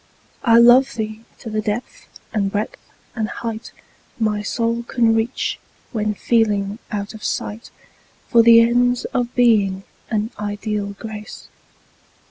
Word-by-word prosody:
I 230 -2 +5
love 245 +3 +6
thee 220 0 -5
to 230 - -8
the 215 0 -1
depth 235 - -4 0.3
and 200 -3 0
breadth 210 +2 -3 0.4
and 220 -2 -2
height 225 -1 -6 0.5
My 215 -2 0
soul 230 +3 -1
can 235 -1 +2
reach, 225 +3 -1 0.3
when 215 -2 -1
feeling 210 -2 +1
out 205 0 -4
of 220 - -11
sight 215 +3 -4 0.6
For 235 - +5
the 230 0 +8
ends 245 +1 +2
of 245 -1 -1
Being 205 -6 +3 0.3
and 220 0 -1
ideal 205 -1 -3
Grace. 215 -1 -9
225 Hz, 130 wpm, -20 LUFS, 210-235 Hz, 0.6 s, the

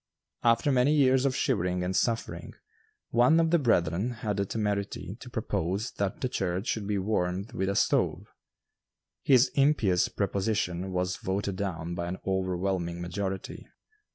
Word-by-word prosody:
After 115 +4 +3
many 130 +3 +3
years 130 -2 +4
of 135 -2 +1
shivering 90 -10 0
and 90 +1 -2
suffering, 115 +2 -1 0.6
one 125 +8 +5
of 165 -1 +2
the 170 - +4
brethren 95 - +1 0.2
had 105 -2 0
the 100 -1 0
temerity 105 -2 -2
to - - -10
propose 95 +8 -2
that 100 -1 -2
the 130 - +1
church 95 -4 -2
should 110 -5 -2
be 105 -1 0
warmed 95 +2 -1
with 95 -4 -1
a 100 - -1
stove. - - +1 1.0
His 130 -1 +5
impious 135 -11 +2
proposition 95 -2 -1
was 90 0 -1
voted 95 0 -2
down 85 -4 -3
by 85 0 -3
an 90 +2 -4
overwhelming 95 -2 -1
majority. 95 +2 -4
100 Hz, 150 wpm, -28 LUFS, 90-115 Hz, 1.0 s, one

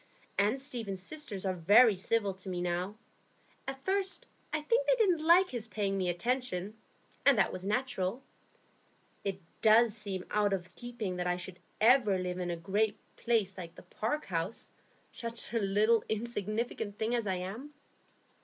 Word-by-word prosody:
And 210 +6 +2
Stephen's 235 -8 -4
sisters 245 -9 -5
are 190 - +1
very 205 +6 +6
civil 200 +1 0
to 190 0 -9
me 180 -1 -2
now. 180 +3 -2 0.7
At 270 0 -6
first, 385 0 0 0.3
I 305 - 0
think 470 +10 +1
they - - +5
didn't 370 -9 +2
like 350 +3 +6
his 235 -3 -4
paying 200 -3 -1
me 185 -2 0
attention; 210 0 -1 0.5
and 280 -4 +6
that 195 - +3
was 185 - -6
natural. 215 0 -1 1.0
It 195 -1 -2 0.2
does 220 0 +6
seem 200 -4 -4
out 210 -1 +2
of 185 -1 -4
keeping 235 -7 -5
that 180 0 -1
I 180 0 +1
should 180 0 -8 0.2
ever 225 -3 +5
live 180 0 -3
in 180 -1 -2
a 170 - -2
great 205 +5 0 0.2
place 220 -5 +1
like 170 -2 -8
the - - -12
Park 300 +8 -3
House, 175 +3 -3 0.4
such 230 0 -4
a 230 - +2
little 215 +3 +3
insignificant 220 -1 -2
thing 220 +2 0
as 235 -3 0
I 190 - +1
am." 200 +11 -6
210 Hz, 165 wpm, -32 LUFS, 190-240 Hz, 1.0 s, very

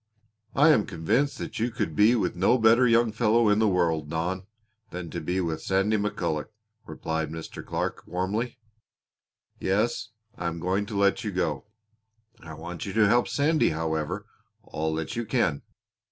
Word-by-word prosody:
"I 150 +3 +6
am 125 -10 +4
convinced 120 - 0
that - - -6
you 115 +2 +1
could 80 -9 -3
be 110 +7 +5
with 90 -7 0
no 95 +8 +3
better 115 +2 +5
young 115 -1 +4
fellow 115 0 +3
in 105 +1 +3
the 110 - +4
world, 80 -5 +1
Don, 90 +4 -2 0.4
than 90 -2 -6
to - - -4
be 90 +1 -1
with 80 -2 -2
Sandy 95 +5 +1
McCulloch," 100 -7 -1 0.4
replied 80 0 -3
Mr. 80 0 -7
Clark - - -3
warmly. 105 +8 -2 1.0
"Yes, 110 +3 0 0.3
I 85 - -3
am 85 0 -3
going 95 +4 -1
to 105 -2 -4
let 100 0 +2
you 105 - -2
go. 85 -1 -2 0.7
I 80 -1 -10
want 85 +5 -7
you 95 - -4
to 110 -2 +4
help 120 +4 +3
Sandy, 155 +2 +2
however, 80 -1 -2 0.4
all 80 +1 -3
that 80 +8 -4
you 120 - -1
can. 110 - 0
95 Hz, 170 wpm, -26 LUFS, 80-110 Hz, 1.0 s, I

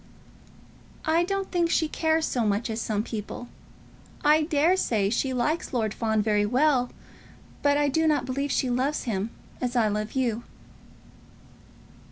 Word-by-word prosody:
"I 325 +2 +3
don't 390 +1 -2
think 345 -2 +1
she 325 -1 +2
cares 320 +1 +1
so 245 - 0
much 210 +2 0
as 220 +1 -3
some 210 -2 -1
people. 225 +2 -6 0.8
I 305 +1 +6
dare 310 +3 +3
say 210 - +1
she 260 +3 0
likes 265 +7 -1
Lord 220 -4 0
Fawn 220 -2 0
very 210 -1 +2
well, 250 +2 +2 0.7
but 285 0 +3
I 290 0 +2
do 320 +3 +2
not 295 -4 +2
believe 275 +2 -2
she 260 - +1
loves 265 +5 0
him 210 -2 -2 0.3
as 250 0 -2
I 225 -3 +3
love 210 +1 -3
you." 240 -4 0
255 Hz, 155 wpm, -26 LUFS, 220-305 Hz, 0.8 s, I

